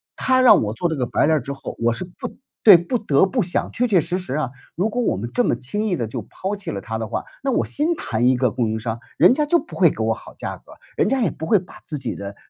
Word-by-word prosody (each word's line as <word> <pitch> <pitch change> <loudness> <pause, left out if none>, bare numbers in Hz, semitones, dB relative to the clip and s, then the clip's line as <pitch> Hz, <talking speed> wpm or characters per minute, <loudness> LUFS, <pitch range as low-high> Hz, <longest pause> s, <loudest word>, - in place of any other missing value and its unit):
他 260 0 +2
让 255 - +7
我 105 0 -2
做 175 +10 -1
这 160 - -1
个 130 -4 -1
白 - - +1
脸 155 +1 +3
儿 - - -2
之 135 +3 -6
后， 135 -1 -7
我 120 0 +3
是 115 +10 -4
不 175 - -9 0.3
对， 205 -5 +10
不 175 +9 -1
得 190 -7 +3
不 235 +4 0
想 175 - -1
确 245 - +1
确 200 -6 +4
实 170 +3 -1
实 180 -8 -4
啊， 150 -5 -1 0.2
如 195 +5 0
果 245 +3 -1
我 210 - 0
们 115 +5 -4
这 245 - +2
么 - - +2
轻 130 - -3
易 190 - +1
地 115 - -2
就 110 - -5
抛 195 +2 -5
弃 200 - -6
了 100 - -4
他 110 +3 -5
的 110 0 -4
话， - - -4 0.2
那 275 - +1
我 - - +1
先 310 +4 0
谈 115 - -1
一 130 0 +4
个 125 0 +2
供 120 -3 -1
应 110 0 -2
商， 115 0 -4 0.2
人 - - +6
家 300 +3 +1
就 340 +3 +3
不 - - -11
会 - - +5
给 - - -8
我 - - +2
好 - - -12
价 - - -5
格， - - -19 0.2
人 - - +2
家 270 - +1
也 220 -8 +2
不 160 - -6
会 205 +5 +4
把 180 - -14
自 155 - -4
己 135 - -4
的 100 0 -7
160 Hz, 325 characters per minute, -21 LUFS, -, 0.3 s, 对